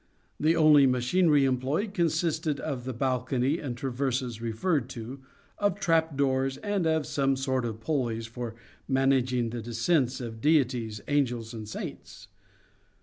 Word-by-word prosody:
The 160 +2 +3
only 150 -4 +6
machinery 140 +4 +3
employed 135 - -1
consisted 160 -3 0
of 130 -5 -4
the 130 - -2
balcony 130 +3 0
and 125 -5 -5
traverses 125 -2 -2
referred 120 +4 -1
to, 125 +2 -7 0.4
of 205 -1 +1
trap 165 -6 +1
doors, 135 -1 +1
and 205 -5 -1
of 160 -2 +1
some 135 -1 +1
sort 130 -2 -1
of 110 -1 -5
pulleys 120 -5 -1
for 115 0 -6 0.3
managing 130 -3 +2
the 120 0 -4
descents 120 +4 0
of 115 -3 -7
deities, 125 -8 +1
angels, 125 -5 0
and 110 -2 -7
saints. - - -8
130 Hz, 140 wpm, -28 LUFS, 120-155 Hz, 0.4 s, only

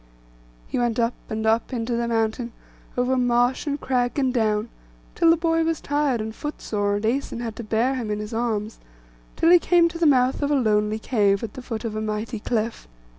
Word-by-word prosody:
He - - -2
went 240 -2 0
up 235 0 +1 0.2
and 220 0 -3
up 225 +3 +1
into 235 -1 -2
the 235 0 -1
mountain, 230 +1 -1 0.4
over 250 +1 +2
marsh, 245 +2 +2
and 285 0 -1
crag, 250 -1 0
and 265 -3 +1
down, 215 -2 +1 0.4
till 335 -1 +3
the 330 - +5
boy 330 0 +1
was 325 -1 0
tired 290 -4 0
and 220 0 -4
footsore, 210 -8 -2
and 205 +2 -2
Æson 240 +1 -1
had 225 -2 -4
to 235 - -5
bear 225 +4 +1
him 245 -5 -3
in 210 - -1
his 210 +1 -6
arms, 225 -2 -2 0.6
till 330 - +4
he 355 - +8
came 345 0 +4
to 335 0 -8
the 335 - +4
mouth 255 -1 +3
of 285 - 0
a 295 - +3
lonely 215 -4 +2
cave, 205 -3 +1
at 220 - -5
the 260 - -8
foot 230 -2 -5
of 220 -1 -3
a 215 - -2
mighty 215 +1 -3
cliff. 225 - -2
235 Hz, 215 wpm, -24 LUFS, 220-265 Hz, 0.6 s, he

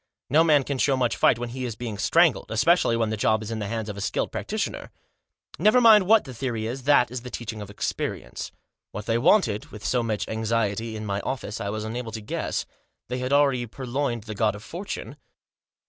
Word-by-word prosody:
No 155 +3 +6
man 150 -4 +4
can 135 0 -3
show 135 0 +3
much 125 -2 +1
fight - - +4
when 120 0 -4
he 130 +2 -5
is 120 -4 -3
being 115 -4 -6
strangled; 165 +8 +3
especially 115 +1 +3
when 115 -2 0
the - - 0
job 110 +1 +2
is 110 - -6
in 110 - -3
the 105 - -3
hands 110 0 -3
of 105 - -5
a - - -5
skilled - - -1
practitioner. - - -3 0.7
Never 215 +4 +5
mind 215 -5 +7
what 220 +1 +6
the 130 - -9
theory 115 -3 -3
is, 125 +3 -5
that 130 -5 +4
is 125 -1 -4
the 125 - -8
teaching 115 -3 -6
of 100 - -8
experience. 105 - -4 0.4
What 105 - -6
they 115 0 +1
wanted, 120 - +3
with 105 - -11
so 125 - +1
much 110 -2 -2
anxiety, 110 0 -1
in 110 0 -5
my 100 -1 -1
office, 115 -4 -4
I 100 - -2
was 110 +1 -3
unable 115 +1 -4
to 110 - -4
guess. 105 - -3 0.4
They 125 +1 -2
had 130 +1 -3
already 140 -4 +3
pur 130 +4 -8
loined 120 -3 -1
the 110 0 -6
God 105 0 +1
of 105 - -10
Fortune. 180 +10 -6
115 Hz, 225 wpm, -25 LUFS, 110-135 Hz, 0.7 s, mind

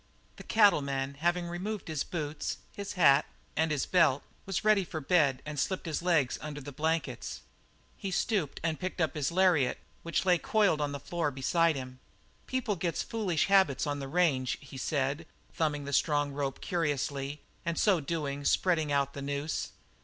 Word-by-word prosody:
The - - -9
cattleman, 140 -10 +3
having 175 +2 +1
removed 190 +4 -4
his 155 -3 -1
boots, 150 -3 -4 0.2
his 200 0 -5
hat, 150 -6 +6 0.3
and 160 +1 +2
his 150 -3 0
belt, 160 -7 +3 0.2
was 195 +2 -2
ready 215 -2 +5
for 165 -2 -5
bed, 145 -4 +2
and 150 -2 -4
slipped 190 +7 -1
his 160 -1 -2
legs 165 -8 +2
under 150 -1 -6
the 145 0 -8
blankets. 160 +4 -2 0.6
He 195 - -4
stooped 190 - 0
and 165 -2 -1
picked 185 0 -4
up 160 -4 +1
his 150 0 -1
lariat, 175 -8 +3 0.2
which 170 +2 -1
lay 180 -2 +4
coiled 215 - +2
on 145 -1 0
the 140 - -4
floor 165 +2 -1
beside 160 +4 +2
him. 130 -1 -7 0.5
"People 255 -5 -1
gets 170 -1 -1
into - - -16
foolish 200 -8 +1
habits 190 -9 +4
on 145 -1 -2
the 135 - -5
range," 135 -8 +1
he 140 -1 -12
said, 140 +3 -1 0.3
thumbing 150 -3 -1
the 140 - -5
strong 145 0 +2
rope 140 -1 -3
curiously, 145 -3 -2 0.2
and 170 -1 -2
so 195 -5 +4
doing, 145 -2 -3
spreading 160 -1 +2
out 140 -1 +1
the 140 - -6
noose. 140 +2 -2
155 Hz, 175 wpm, -30 LUFS, 140-175 Hz, 0.6 s, hat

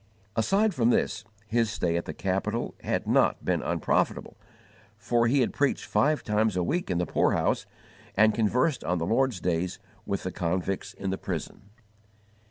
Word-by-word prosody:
Aside 195 - +2
from 120 -6 +2
this, 110 -3 +1 0.2
his 115 0 +1
stay 90 -6 -1
at 85 - -1
the - - -5
capital - - -2
had - - -1
not - - +2
been - - +1
unprofitable, - - 0 0.6
for 120 -1 +1
he 135 +3 +3
had 120 - 0
preached 145 -1 0
five 150 +1 +1
times 105 -1 +1
a 90 - +1
week 175 - -1
in 90 - 0
the 90 - +1
poorhouse - - +1 0.5
and 110 +1 +5
conversed 125 +7 +1
on 90 - 0
the 85 - -1
Lord's 120 0 +1
days 90 +1 -1 0.3
with 100 - -2
the 95 - -3
convicts 90 +2 -2
in 95 -1 -3
the 95 - -3
prison. 100 0 -6
110 Hz, 170 wpm, -27 LUFS, 90-125 Hz, 0.6 s, and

